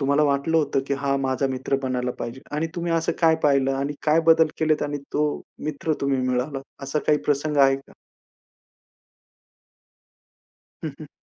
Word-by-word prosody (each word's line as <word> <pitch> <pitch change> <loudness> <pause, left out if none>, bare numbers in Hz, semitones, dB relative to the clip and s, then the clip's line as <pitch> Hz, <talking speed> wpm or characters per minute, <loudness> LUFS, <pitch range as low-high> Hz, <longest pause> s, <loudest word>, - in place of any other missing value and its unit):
तुम्हाला 140 +2 +3
वाटलं 145 +3 +1
होतं, 150 -3 +2
की 140 - 0
हा 140 0 0
माझा 135 0 0
मित्र 130 +1 -1
बनायला 125 -1 -1
पाहिजे 120 +3 -5 0.2
आणि 160 +2 0
तुम्ही 170 -1 -2
असं 165 0 +1
काय 160 -1 +5
पाहिलं 135 -2 +3
आणि 140 +2 -2
काय 155 +2 +5
बदल 160 0 +6
केलेत 155 -1 +2
आणि 145 0 -2
तो 150 +1 +2 0.4
मित्र 155 +1 -2
तुम्ही 140 -1 +1
मिळाला 130 +2 -1 0.2
असा 135 +3 -1
काही 150 -1 +4
प्रसंग 150 +1 0
आहे 135 -1 +5
का? 135 - -16 2.9
हं, - - -2
हं. - - -9
140 Hz, 160 wpm, -24 LUFS, 135-155 Hz, 2.9 s, बदल